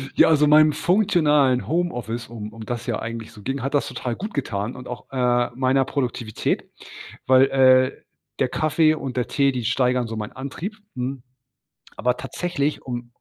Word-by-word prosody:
Ja, - - +6
also 150 -2 +4
meinem 155 0 +6
funktionalen 150 -10 +2
Homeoffice, 120 -8 -2
um 110 -2 -8
um 115 -1 -9
das 120 0 -4
ja 120 - -1
eigentlich 115 -1 -6
so 105 - -14
ging, 135 +3 -3
hat 135 +3 -3
das 145 - +1
total 120 -2 -4
gut 210 - -6
getan 110 -5 -3
und 125 0 -9
auch, 125 - -7
äh, 120 -2 +1
meiner 130 +1 +2
Produktivität, 120 -5 -2 0.6
weil, 130 0 +6
äh, 130 -1 +4 0.4
der - - +2
Kaffee 155 0 +2
und 135 -5 -5
der 125 - 0
Tee, 140 -1 +2
die 125 -2 -4
steigern 125 0 +1
so 110 0 -6
meinen 105 -1 -5
Antrieb, 150 +10 -6 0.2
hm, 130 +1 -4 0.7
aber 125 +1 0
tatsächlich 155 -3 -2
um 120 -2 -6
130 Hz, 175 wpm, -23 LUFS, 120-145 Hz, 0.7 s, Ja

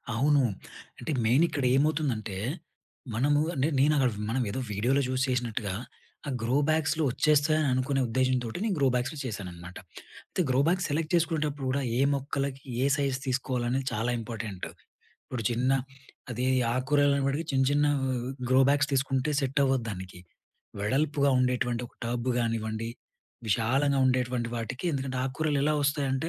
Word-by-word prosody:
అవును. 140 +2 +3 0.6
అంటే 160 - -4
మెయిన్ 125 +9 +4
ఇక్కడ 140 - -3
ఏమవుతుందంటే, 135 -9 0 0.8
మనము 145 +5 +3
అంటే 135 +2 +1
నేను 150 +3 +4
అక్కడ 130 -4 +3 0.2
మనం 125 +3 0
ఏదో 130 - -3
వీడియోలో 125 +8 +2
చూసి 130 0 0
చేసినట్టుగా, 120 -5 -1 0.5
ఆ - - -1
గ్రో 120 +4 +1
బ్యాగ్స్‌లో 155 0 +1
వచ్చేస్తాయి 150 +3 +3
అని 150 - +1
అనుకునే 135 +2 +1
ఉద్దేశ్యంతోటి 125 -1 0
నేను 215 -4 0
గ్రో 135 - +4
బ్యాగ్స్‌లో 130 +5 -1
చేశాననమాట. 90 -6 -7 0.5
అయితే, - - -1
గ్రో 130 +1 +3
బ్యాగ్స్ 180 +2 +1
సెలెక్ట్ 155 +2 -1
చేసుకునేటప్పుడు 155 -4 0
కూడా, 140 +1 0 0.2
ఏ - - +1
మొక్కలకి 140 -1 -2 0.2
ఏ - - +3
సైజ్ 140 -2 0
తీసుకోవాలనేది 130 0 -1
చాలా 115 +3 0
ఇంపార్టెంటు. 110 -4 -5 0.6
ఇప్పుడు 120 -4 -5
చిన్న 125 +2 +1 0.6
అది 120 +2 -2 0.3
ఆకుకూరలు 145 +2 +3
అనే‌పాటికి 140 +3 0
చిన్న, 135 0 +3
చిన్న 145 +1 +3 0.2
ఆహ్, 130 -1 -2 0.2
గ్రో 130 +1 +6
బ్యాగ్స్ 145 0 +3
తీసుకుంటే 135 +1 +1
సెట్ 135 +1 0
అవ్వదు 130 -3 +1
దానికి. 95 -2 -8 0.6
వెడల్పుగా 140 +5 +1
ఉండేటువంటి 125 -1 0
ఒక - - -29
టబ్ 120 +1 -2
గానివ్వండి. 115 -1 -2 0.6
విశాలంగా 135 +7 +2
ఉండేటువంటి 125 -2 0
వాటికి 125 +7 -5
ఎందుకంటే, 130 -2 -2
ఆకుకూరలు 145 +2 -1
ఎలా 150 +1 +2
వస్తాయంటే 140 +1 0
130 Hz, 145 wpm, -28 LUFS, 120-145 Hz, 0.8 s, గ్రో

